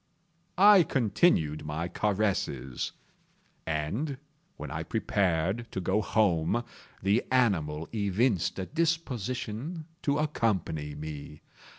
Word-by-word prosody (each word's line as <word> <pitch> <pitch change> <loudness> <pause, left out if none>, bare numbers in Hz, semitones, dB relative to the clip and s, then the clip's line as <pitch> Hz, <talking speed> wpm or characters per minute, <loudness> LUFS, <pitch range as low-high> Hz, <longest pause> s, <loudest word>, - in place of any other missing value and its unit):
I 200 0 +8
continued 110 - +2
my 75 +3 -3
caresses, 100 -9 -1 0.7
and, 95 - -2 0.4
when 75 -2 -6
I 80 +1 -3
prepared 95 +2 0
to - - -2
go 95 +3 +1
home, 105 0 +2 0.4
the 100 +5 +3
animal 85 -12 +1
evinced 100 -2 +1
a 95 - -2
disposition 140 - -2 0.2
to 140 0 +1
accompany 95 - -1
me. 75 0 -7
100 Hz, 95 wpm, -29 LUFS, 80-125 Hz, 0.7 s, I